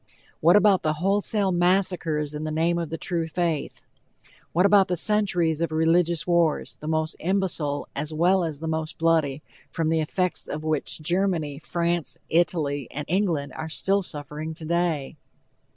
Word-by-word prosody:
What 170 +4 +5
about 205 -2 +5
the 155 - 0
wholesale 195 +4 +1
massacres 175 -4 +1
in 150 +1 -5
the 155 - -3
name 165 +2 +1
of 165 -3 -3
the 165 - -4
true 170 -2 -2
faith? 165 -2 -2 0.7
What 180 +3 +3
about 200 -1 +5
the 180 - -1
centuries 180 -6 +1
of 170 - 0
religious 165 +1 +2
wars, 170 -3 +1
the 150 - -9
most 155 0 0
imbecile 170 -6 -1
as 150 +2 -3
well 175 +4 +3
as 155 -3 -4
the 160 - -4
most 160 0 -3
bloody, 160 -3 +1 0.3
from 165 -1 -1
the 160 0 +2
effects 180 +4 -2
of 155 +1 -5
which 155 0 -2
Germany, 170 -4 0
France, 170 0 -1
Italy 150 -5 +1
and 150 0 -5
England 165 -7 0
are 160 - -5
still 195 +5 +1
suffering 155 -1 -6
today? 165 -3 -1
165 Hz, 160 wpm, -25 LUFS, 155-180 Hz, 0.7 s, What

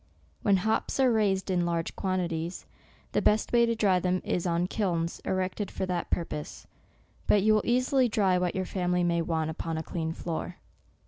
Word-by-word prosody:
When 200 -2 +4
hops 220 +7 -1
are 260 -2 +5
raised 195 -4 +1
in 180 -1 +2
large 170 -1 -2
quantities, 175 -3 -2 0.5
the - - +1
best 215 +3 +2
way 235 0 +5
to 230 - +1
dry 195 -5 +3
them 180 +1 0
is 180 0 -1
on 170 +1 +1
kilns, 175 -4 -1
erected 185 +2 -1
for - - -3
that 180 -2 -2
purpose; 160 -3 -4 0.6
but 205 -2 +4
you 215 +1 +5
will 215 - +3
easily 255 +1 +2
dry 195 -5 +2
what 180 -1 -1
your 190 -1 -1
family 180 -1 0
may 170 -1 +1
want 160 -1 -1
upon 165 0 -4
a 160 - -3
clean 160 -1 -3
floor. 170 +1 -4
185 Hz, 185 wpm, -28 LUFS, 170-210 Hz, 0.6 s, are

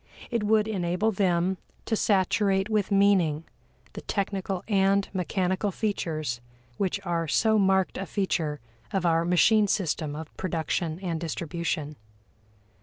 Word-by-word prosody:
It 235 -2 0
would 215 0 +3
enable 185 +1 0
them 185 -2 +1 0.3
to 225 - 0
saturate 195 0 +2
with 210 -3 +1
meaning 195 -6 +3 0.5
the - - -7
technical 195 -2 -2
and 195 -1 +3
mechanical 185 +2 0
features 155 - -2 0.4
which 195 0 0
are 170 -2 -1
so 220 +6 +3
marked 190 -1 +2
a 195 - -4
feature 160 -7 -1 0.3
of 190 -2 -1
our 165 -1 +3
machine 205 +5 +4
system 155 -6 -1
of 155 0 -8
production 165 -1 -2
and 170 -4 -2
distribution. 160 -2 -3
190 Hz, 125 wpm, -27 LUFS, 165-200 Hz, 0.5 s, machine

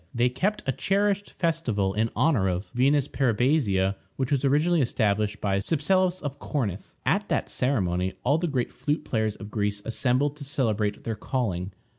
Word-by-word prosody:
They 120 +1 +3
kept 195 +12 -1
a 135 - +1
cherished 200 - 0
festival 125 - 0
in 110 +2 +1
honor 130 -12 +3
of 90 +2 -3
Venus 135 +3 +3
Peribasia, 115 -7 +1 0.2
which 130 0 -2
was 140 -1 +1
originally 150 +4 +3
established 105 -3 0
by 100 -1 0
Cypselus 180 - +1
of 145 -1 -4
Corinth. 110 -13 -3
At - - +1
that - - -1
ceremony 95 -8 0
all 145 +5 +3
the 175 - 0
great 130 -5 -1
flute 145 +4 -2
players 110 -2 0
of 105 -1 -10
Greece 105 -1 -1
assembled 130 +5 0
to 145 - -8
celebrate 110 -8 -1
their 115 - -2
calling. 100 -6 -2
125 Hz, 165 wpm, -26 LUFS, 105-145 Hz, 0.2 s, They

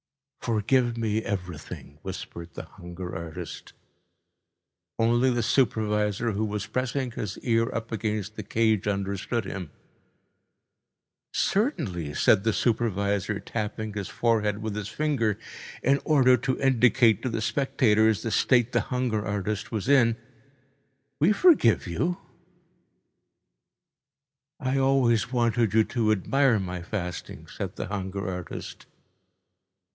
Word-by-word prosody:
"Forgive 120 +2 +1
me 110 -1 0
everything," 90 -6 -6
whispered 85 0 -8
the - - -5
hunger 90 +1 -8
artist. 80 -1 -7 1.2
Only 120 +3 +3
the 120 -2 0
supervisor, 105 -2 +1
who 105 +1 -1
was 105 -1 -3
pressing 130 0 -2
his 105 -4 -5
ear 115 -1 +2
up 115 0 -4
against 105 -2 -2
the 105 - -5
cage, 110 -1 +1
understood 100 +3 -2
him. 90 -5 -5 1.6
"Certainly," 120 - -1
said 95 - +4
the 110 - +2
supervisor, 100 -2 0
tapping 110 -1 -4
his 100 -2 -4
forehead 110 -3 0
with 110 -2 -3
his 105 -2 -4
finger 115 -6 0 0.5
in 140 +2 +3
order 130 -5 +5
to 130 +1 -2
indicate 125 -4 +4
to 130 - -2
the 115 -1 -2
spectators 110 -5 +2
the 115 - -2
state 120 0 +3
the - - +2
hunger 125 -4 -1
artist 105 0 -3
was 110 -1 -3
in, 120 -5 +4 1.0
"we 160 +7 +4
forgive 210 - +4
you." 165 - -1 2.4
"I 135 -1 0
always 125 -5 +2
wanted 115 -3 +1
you 110 - +6
to 110 -2 0
admire 125 +5 +3
my 90 -2 -4
fasting," 90 -2 -5
said - - -6
the - - -4
hunger 95 -1 -4
artist. 90 -2 -6
110 Hz, 120 wpm, -26 LUFS, 100-125 Hz, 2.4 s, you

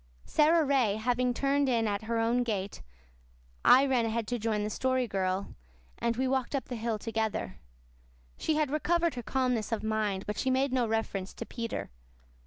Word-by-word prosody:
Sara 315 +1 +4
Ray 260 -7 +2
having 245 +3 +1
turned 275 +2 +1
in 230 -3 +2
at 205 +1 -2
her 230 +1 -1
own 230 +2 +2
gate, 205 - -3 0.8
I 265 +2 +7
ran 260 -3 +2
ahead 225 0 -1
to 245 -1 -1
join 215 -1 0
the 210 - -2
Story 260 0 0
Girl, 190 -1 -2 0.5
and 235 -1 0
we 260 +1 +1
walked 265 +1 0
up 275 - -2
the 250 - -3
hill 225 -1 -2
together. 220 - -3 0.8
She 315 - -1
had 300 -3 +1
recovered 340 +2 +1
her 245 - -5
calmness 250 -3 -1
of 225 -1 -1
mind, 215 -3 -1
but 210 - -4
she 265 - 0
made 260 +1 +1
no 250 -3 +2
reference 215 -4 -2
to - - -6
Peter. 230 -1 -5
235 Hz, 185 wpm, -30 LUFS, 220-260 Hz, 0.8 s, I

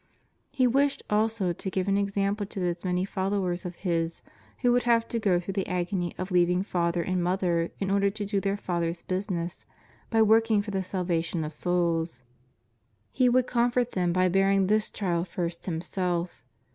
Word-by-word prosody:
He 265 -2 +2
wished 275 +3 +2
also 210 -4 +1
to 190 - -5
give 185 0 -2
an 195 - +2
example 200 0 0
to 200 - -7
those 175 -1 -2
many 180 0 0
followers 190 -2 -1
of 175 -1 -5
His 165 -1 -1 0.4
who 245 - +5
would 245 0 +3
have 230 -1 +2
to 230 - -1
go 195 -5 +2
through 180 +2 -5
the 195 -1 -2
agony 180 -1 -2
of 185 +1 -5
leaving 180 +1 +3
father 170 -3 0
and 185 0 -1
mother 175 -2 +1
in 195 -1 -1
order 200 0 +3
to 205 +1 -4
do 200 0 0
their 200 0 0
Father's 170 -3 -2
business 185 -2 -3 0.5
by 225 -1 +4
working 220 -1 +4
for 205 - -6
the 195 -1 -1
salvation 175 -3 -1
of 155 +1 -5
souls. 165 -4 0 0.9
He 255 -2 +3
would 250 +1 +3
comfort 245 0 +1
them 180 -2 0
by 185 +1 +3
bearing 195 +1 +3
this 215 +2 +2
trial 175 -4 -1
first 170 -1 -4
Him 165 -3 -2
self. 175 -7 -3
185 Hz, 185 wpm, -27 LUFS, 175-205 Hz, 0.9 s, who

